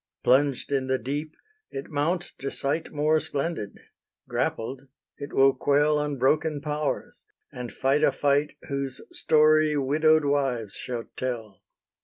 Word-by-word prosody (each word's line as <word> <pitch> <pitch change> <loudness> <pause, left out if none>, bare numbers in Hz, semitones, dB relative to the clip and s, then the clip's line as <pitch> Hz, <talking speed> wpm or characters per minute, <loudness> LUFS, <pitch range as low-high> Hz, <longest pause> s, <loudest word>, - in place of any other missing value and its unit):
Plunged 135 +1 +2
in 135 -2 0
the 130 0 +1
deep, 145 +6 -4 0.3
it 135 +3 -7
mounts 170 +5 -1
to 135 - -3
sight 145 +5 -2
More 155 +1 +2
splendid: 140 -8 -3 0.5
grappled, 130 +4 -3 0.3
it 140 - -6
will 135 0 +5
quell 145 +1 +2
Unbroken 150 +2 +1
powers, 150 0 -3 0.3
and 125 -1 -6
fight 140 +3 +1
a - - +5
fight 145 +1 +1
Whose 140 -2 -3
story 155 0 +4
widow'd 155 +3 +3
wives 130 -7 0
shall 120 -2 -5
tell. 115 -6 -4
140 Hz, 130 wpm, -26 LUFS, 130-150 Hz, 0.5 s, will